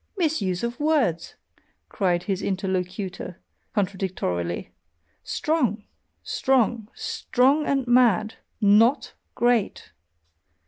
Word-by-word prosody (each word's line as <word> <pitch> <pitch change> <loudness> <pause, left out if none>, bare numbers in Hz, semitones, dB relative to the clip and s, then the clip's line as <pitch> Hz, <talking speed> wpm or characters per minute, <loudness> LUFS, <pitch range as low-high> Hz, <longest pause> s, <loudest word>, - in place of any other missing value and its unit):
"Misuse 235 - 0
of 235 +1 -3
words!" 285 - 0 0.5
cried 180 -4 0
his 195 -2 -2
interlocutor, 185 -1 -3 0.4
contradictorily 185 - -2 0.5
"strong! 250 - -1 0.4
strong! 235 -4 +1
Strong 275 +5 +1
and 275 -2 +1
mad! 235 -3 +3 0.3
NOT 220 +6 +4 0.2
great!" 240 -4 0
215 Hz, 80 wpm, -24 LUFS, 185-250 Hz, 0.5 s, NOT